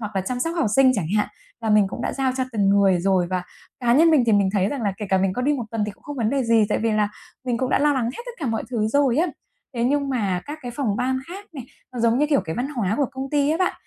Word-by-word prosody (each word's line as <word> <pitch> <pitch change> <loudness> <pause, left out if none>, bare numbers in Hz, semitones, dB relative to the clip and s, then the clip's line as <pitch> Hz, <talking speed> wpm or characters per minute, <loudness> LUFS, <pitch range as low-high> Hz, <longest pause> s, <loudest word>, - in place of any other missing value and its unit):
hoặc 210 -3 -5
là 190 - +2
chăm 245 +6 -4
sóc 330 +4 -1
học 310 - +1
sinh 260 -1 +6
chẳng 185 -8 -1
hạn 210 - +1 0.3
là 225 -2 -1
mình 210 -2 +5
cũng - - -6
đã - - -2
giao 265 -1 0
cho 260 - 0
từng 200 -3 +1
người 195 -3 +4
rồi 185 -1 +2
và 180 -1 -1 0.4
cá 240 -1 +2
nhân 325 +4 +6
mình 305 -5 +5
thì 225 - +3
mình 200 -2 +3
thấy 195 -1 +2
rằng 280 -4 -4
là 200 -3 0
kể 210 - -5
cả 190 - +3
mình 190 0 +1
có 250 +6 -3
đi 290 +3 +2
1 250 -5 -2
tuần 225 -2 -1
thì 210 - -3
cũng - - -26
không 290 -1 -7
vấn 225 -2 0
đề 275 -1 +1
gì, 230 -2 +4
tại - - +1
vì 225 0 0
là 210 -1 +2 0.4
mình 245 -3 -1
cũng 260 - -1
đã - - +3
lo 295 +1 +3
lắng 260 -4 0
hết 255 - -4
tất - - -6
cả 290 - -3
mọi 225 -1 -1
thứ 220 -3 0
rồi 270 0 +2
á. 335 +4 +3 0.5
Thế 235 0 0
nhưng 280 +1 +1
mà 200 -9 -1
các 300 +2 -6
cái 245 - -5
phòng 225 -8 0
ban 260 +1 0
khác 390 +3 -8
này, 265 -6 -7 0.3
nó 245 - -4
giống 235 +2 +3
như, 300 - +3
kiểu, 285 -3 +2
cái 160 - -4
văn 255 +3 -2
hóa 220 -9 -1
của 280 - +1
công 265 0 -5
ty 290 -1 +2
á 320 - +1
bạn, 370 - +1
240 Hz, 325 wpm, -23 LUFS, 210-275 Hz, 0.5 s, sinh